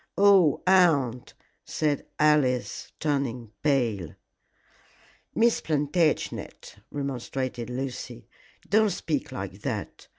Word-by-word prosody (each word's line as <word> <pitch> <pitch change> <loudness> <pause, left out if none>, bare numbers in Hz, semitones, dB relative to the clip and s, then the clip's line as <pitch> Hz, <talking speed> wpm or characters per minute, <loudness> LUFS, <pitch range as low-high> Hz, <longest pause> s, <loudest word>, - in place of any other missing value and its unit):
"Oh, 195 -7 +5
aunt!" 155 -10 +3 0.3
said 150 -2 -1
Alice, 145 -5 +1
turning 130 -7 -2
pale. 120 - 0 1.2
"Miss 235 +1 +3
Plantagenet," 155 +1 -1
remonstrated 130 -3 -4
Lucy, 125 - -5 0.4
"don't 215 +1 +4
speak 160 -5 -3
like - - -6
that. - - -5
145 Hz, 80 wpm, -26 LUFS, 125-160 Hz, 1.2 s, Oh